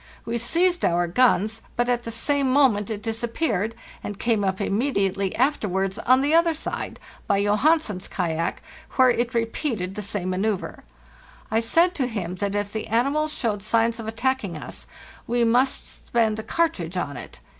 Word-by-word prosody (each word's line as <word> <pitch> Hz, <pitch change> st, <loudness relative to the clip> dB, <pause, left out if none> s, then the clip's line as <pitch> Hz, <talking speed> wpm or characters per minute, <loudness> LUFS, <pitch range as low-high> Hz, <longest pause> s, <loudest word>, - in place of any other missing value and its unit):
We 235 Hz, +1 st, -2 dB
seized 345 Hz, +8 st, +2 dB
our 175 Hz, 0 st, +2 dB
guns, 220 Hz, +2 st, +2 dB
but 240 Hz, 0 st, +1 dB
at 240 Hz, -1 st, 0 dB
the 230 Hz, -, -4 dB
same 275 Hz, +3 st, 0 dB
moment 250 Hz, -7 st, +3 dB
it 210 Hz, -1 st, -4 dB
disappeared, 225 Hz, -, -1 dB, 0.3 s
and 205 Hz, -, -5 dB
came 225 Hz, -3 st, +1 dB
up 190 Hz, -1 st, 0 dB
immediately 200 Hz, -3 st, 0 dB
afterwards 205 Hz, -7 st, 0 dB
on 255 Hz, +3 st, +4 dB
the 290 Hz, +3 st, +1 dB
other 335 Hz, 0 st, +4 dB
side, 310 Hz, -, -5 dB, 0.3 s
by 200 Hz, -, +2 dB
Johansen's 210 Hz, -, +2 dB
kayak, 170 Hz, -2 st, -2 dB, 0.3 s
where 255 Hz, -2 st, +5 dB
it 240 Hz, +1 st, -1 dB
repeated 225 Hz, -, -1 dB
the 210 Hz, -, -5 dB
same 200 Hz, -3 st, -2 dB
manceuvre. 195 Hz, +1 st, -2 dB, 0.7 s
I 220 Hz, -, +3 dB
said 335 Hz, +10 st, +3 dB
to 265 Hz, -7 st, -1 dB
him 185 Hz, -6 st, -4 dB
that 200 Hz, +1 st, -2 dB
if 205 Hz, 0 st, -2 dB
the 220 Hz, -, -4 dB
animal 275 Hz, +7 st, +1 dB
showed 225 Hz, -9 st, -2 dB
signs 230 Hz, +2 st, +1 dB
of 225 Hz, -, -6 dB
attacking 225 Hz, -5 st, -1 dB
us -, -, -9 dB, 0.4 s
we 240 Hz, +1 st, +2 dB
must 245 Hz, +3 st, 0 dB
spend 220 Hz, -2 st, +1 dB
a -, -, -4 dB
cartridge 195 Hz, -, -1 dB
on 145 Hz, -5 st, -2 dB
it. -, -, -10 dB
225 Hz, 165 wpm, -24 LUFS, 200-255 Hz, 0.7 s, where